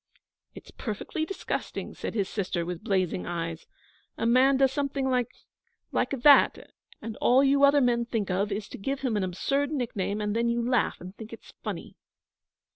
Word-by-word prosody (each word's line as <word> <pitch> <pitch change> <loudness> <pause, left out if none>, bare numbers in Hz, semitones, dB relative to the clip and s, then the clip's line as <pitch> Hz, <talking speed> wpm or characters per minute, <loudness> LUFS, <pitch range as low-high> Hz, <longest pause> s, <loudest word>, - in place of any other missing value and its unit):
'It's - - -12
perfectly 240 +7 -4
disgusting,' 390 - -4
said - - -6
his 200 -4 0
sister, 185 -4 -2
with 175 -1 -5
blazing 185 -3 0
eyes. 165 -1 -4 0.5
'A - - -1
man 260 +3 +5
does 265 -1 +4
something 275 -1 -1
like 250 -2 +1 0.6
like - - +1
that 290 -1 +5 0.3
and 225 -1 -5
all 260 +3 +4
you 280 +1 +3
other 280 0 +6
men 240 -2 +2
think 225 -5 -2
of 200 +3 0
is 200 +1 -3
to - - -10
give 270 +7 -3
him 255 -5 0
an 205 - 0
absurd 275 +10 -1
nickname, 220 -8 -2
and 210 0 -2
then 235 +1 +1
you 235 0 0
laugh 250 -2 +1
and 185 +2 -10
think 220 -1 -9
it's 230 - -12
funny.' - - -6
230 Hz, 180 wpm, -27 LUFS, 195-270 Hz, 0.6 s, other